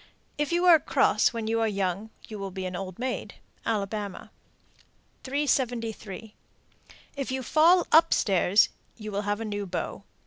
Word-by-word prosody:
If 295 +1 0
you 345 +1 +2
are 340 -3 +8
cross - - +2
when 230 -2 -4
you 225 +1 0
are 225 - +2
young, 200 0 -2 0.2
you 215 -2 -8
will 195 0 -4
be 190 0 -6
an 180 0 -4
old 185 -1 -6
maid. 255 +1 -4 0.3
Alabama. 205 -2 -3 0.9
376. 240 -7 -2 0.9
If 275 -2 -4
you 260 0 -2
fall 335 +7 +4
up 330 +1 +6
stairs, 195 +1 +3 0.3
you 215 -2 -7
will 200 0 -1
have 205 +1 0
a 225 - -4
new 205 -1 -4
beau. 180 - -4
220 Hz, 160 wpm, -27 LUFS, 200-260 Hz, 0.9 s, are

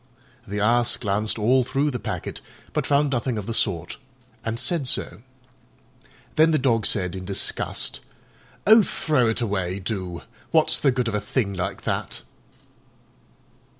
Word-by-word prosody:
The 105 +1 -3
Ass 120 +3 +3
glanced 105 +1 -1
all 125 +4 +3
through 140 +4 0
the 125 - -3
packet, - - -5 0.3
but - - -1
found 145 0 +3
nothing 120 -2 -1
of 105 - -4
the 115 - -3
sort, 85 -5 -1 0.5
and 115 0 -2
said 140 +2 0
so. 95 -4 -1 1.2
Then 160 +1 +6
the 155 - +3
Dog 115 -6 +2
said 90 -3 0
in 95 - -6
disgust, 95 +1 -2 0.7
"Oh, 220 +2 +8
throw 150 - +1
it 115 - -1
away, 95 -4 -1
do: 95 -3 -4 0.3
what's - - +3
the 140 - +3
good 125 -2 0
of 115 - -2
a 105 - 0
thing 105 -1 -1
like 90 -1 -4
that?" - - -3
115 Hz, 150 wpm, -24 LUFS, 100-130 Hz, 1.2 s, Oh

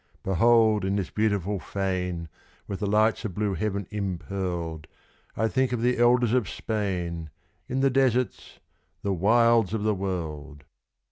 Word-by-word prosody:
Behold 110 +2 +4
in 95 +1 0
this 100 -3 -2
beautiful 100 -2 0
fane, 90 -1 -3 0.4
with 100 - -4
the 105 - -1
lights 110 +3 +2
of 100 -6 -4
blue 105 -2 0
heaven 100 +2 -2
impearled, 90 -5 -4 0.5
I 110 - +2
think 130 +2 +1
of 120 -1 -1
the 125 0 +2
Elders 120 -1 +4
of 125 -8 +1
Spain, 90 -7 -3 0.4
in 130 +2 0
the 135 0 +3
deserts 125 -2 0 0.5
the 100 - 0
wilds 115 +2 +3
of 105 - -2
the 110 0 +2
world! 80 -7 -5
100 Hz, 145 wpm, -26 LUFS, 90-115 Hz, 0.5 s, Behold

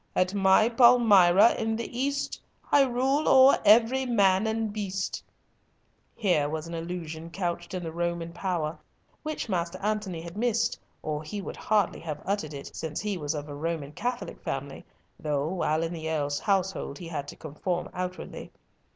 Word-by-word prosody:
At 185 +1 +2
my 195 +2 +5
Palmyra, 230 -5 +6
in 225 0 0
the 235 +1 -5
East, 280 +3 -2 0.3
I 285 - +6
rule 265 +4 +1
o'er 265 +1 +7
every 230 +5 +5
man 200 -3 +3
and 220 -1 -1
beast" 195 -3 -3 0.9
Here 175 -9 +1
was 155 +1 -4
an 170 - -8
allusion 165 -1 -5
couched 175 0 -3
in 180 - -4
the 165 - -4
Roman 170 0 -3
power, 170 -4 -2 0.4
which 310 -4 -4
Master 175 -2 -2
Antony 210 -4 -2
had 170 +1 -9
missed, 230 0 0 0.2
or 150 -1 -2
he 205 +7 -6
would 195 - -6
hardly 210 -3 +1
have 155 -3 -5
uttered 185 -7 -2
it, 140 - -9
since 160 -2 -4
he 210 -1 -2
was 150 -3 -3
of 145 0 -5
a 145 - -7
Roman 150 -1 -3
Catholic 240 +10 -4
family, 135 0 -5 0.4
though, 145 -1 -1
while 160 -2 0
in 165 +1 -3
the 160 -1 -4
Earl's 145 -2 -1
household, 190 -7 -1
he 175 - -8
had 145 -4 -4
to - - -8
conform 175 +3 -3
outwardly. 180 0 -6
180 Hz, 170 wpm, -27 LUFS, 160-215 Hz, 0.9 s, o'er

